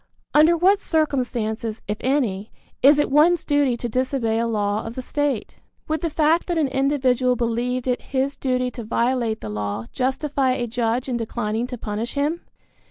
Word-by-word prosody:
Under 315 +3 +5
what 385 +4 +4
circumstances, 245 - -1
if 210 +1 -2
any, 230 -7 0 0.3
is 285 +2 +7
it 295 - +1
one's 320 +4 +4
duty 285 -4 +2
to 240 - -4
disobey 240 -2 0
a 230 - 0
law 210 -1 -1
of 225 +1 -7
the 255 - -4
state? 290 -5 -2 0.3
Would 315 0 -1
the 335 - -1
fact 315 +2 +2
that 345 -2 -1
an 300 -4 +1
individual 260 -2 +2
believed 240 +1 -1
it 250 -1 0
his 270 +1 -1
duty 255 -1 -1
to 240 - -7
violate 235 0 0
the 110 - -6
law 105 +1 -3
justify 265 0 0
a 250 -2 -2
judge 235 +1 -1
in 250 -2 -1
declining 225 0 -2
to 250 - -6
punish 220 +3 -4
him? 295 +4 0
255 Hz, 175 wpm, -22 LUFS, 230-285 Hz, 0.3 s, is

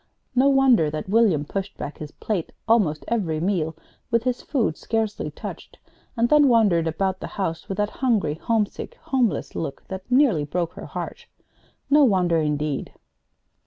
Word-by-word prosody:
No 260 +2 +4
wonder 265 - +4
that 155 +3 -5
William 200 -9 +3
pushed 195 +5 -5
back 145 - -6
his 150 - -6
plate 185 +1 -3 0.2
almost 195 -10 +2
every 180 -10 -1
meal 165 -3 0 0.3
with 230 -2 +2
his 250 -1 -1
food 230 - 0
scarcely 220 -2 -2
touched, - - -9 0.4
and 230 +1 +3
then 295 +1 +5
wandered 205 -9 +4
about 190 +3 -1
the - - -5
house 165 -5 -3
with 195 - -3
that 210 0 0
hungry, 225 - +1
homesick, 210 +6 -2
homeless 240 - -1
look 145 -4 -5
that 190 +2 -7
nearly 250 - +4
broke 170 +3 -2
her - - -9
heart. - - -6 0.6
No 290 +1 +5
wonder, 180 -8 +3
indeed! 150 -2 -1
195 Hz, 160 wpm, -24 LUFS, 160-235 Hz, 0.6 s, then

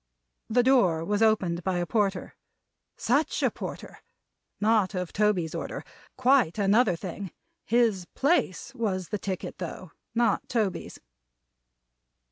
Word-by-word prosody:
The 245 +2 +3
door 190 -12 +3
was 205 +2 0
opened 185 -6 +2
by 190 -2 0
a 175 - 0
Porter. 195 -1 -1 0.6
Such 280 +7 +1
a - - +3
Porter! - - -8 0.6
Not 215 -2 +2
of 180 -2 -3
Toby's 200 -6 +1
order. - - -5 0.3
Quite 255 -9 +3
another 205 0 +3
thing. 190 +2 -6 0.4
His 225 -6 +2
place 270 - +1
was 195 -8 -2
the 210 - -2
ticket, 190 -2 -5
though; 180 -1 -6 0.2
not 235 0 +1
Toby's. 220 -6 -2
205 Hz, 120 wpm, -27 LUFS, 185-235 Hz, 0.6 s, The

